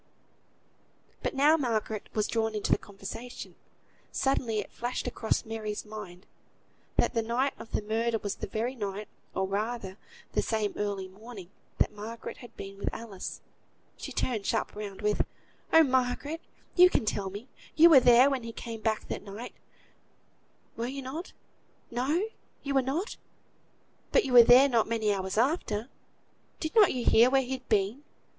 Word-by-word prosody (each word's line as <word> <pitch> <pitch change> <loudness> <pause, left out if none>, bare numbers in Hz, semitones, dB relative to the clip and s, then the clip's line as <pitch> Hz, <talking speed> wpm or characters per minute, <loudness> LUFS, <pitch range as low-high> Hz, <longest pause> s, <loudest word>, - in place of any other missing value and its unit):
But - - -2
now 295 +4 +5
Margaret 220 -6 -2
was 215 -1 +2
drawn 225 -1 -1
into 210 - -1
the - - +4
conversation. 210 +5 -8 0.6
Suddenly 260 -5 0
it 210 - -3
flashed 245 +2 -3
across 220 - -1
Mary's 220 -1 -4
mind, 210 -4 -9 0.7
that - - +3
the 230 - +2
night 240 +5 0
of 225 - -10
the - - -1
murder 225 +2 0
was 205 -2 -3
the - - -4
very 230 +4 -2
night, 205 -3 -4 0.3
or 190 - +1
rather 205 -1 -3 0.3
the - - +1
same 215 -2 -1
early 200 -2 -2
morning, 200 -1 -11 0.3
that - - +2
Margaret 220 +2 -7
had 240 - -13
been 195 0 -8
with - - -1
Alice. 215 -5 -7 0.5
She - - -7
turned 220 -6 -1
sharp - - -1
round, 205 -1 -7
with 210 0 +2 0.5
"Oh! 325 - +8
Margaret, 260 +4 0 0.3
you 360 0 +8
can 230 - +1
tell 200 -2 -1
me; 205 +6 -8 0.3
you 325 +2 +9
were 310 -5 +9
there 250 +1 +7
when 270 -2 0
he 230 0 -6
came 230 -1 -7
back 220 0 -1
that - - -4
night; 210 +4 -8 1.2
were 230 +1 -2
you 270 +1 -5
not? 305 +8 -6 0.6
No! 270 - +1 0.4
you 280 -1 -2
were 270 - +4
not; 295 - -2 0.9
but - - +4
you 260 - -2
were 245 - +11
there 245 +4 +8
not 235 -5 +2
many 220 -2 +1
hours 190 0 -3
after. 235 -3 0 0.7
Did 315 - -3
not 430 -4 +6
you 250 -2 -3
hear 235 +3 +6
where 270 0 +3
he'd 260 +1 -5
been? 210 +6 +1
230 Hz, 165 wpm, -29 LUFS, 210-260 Hz, 1.2 s, were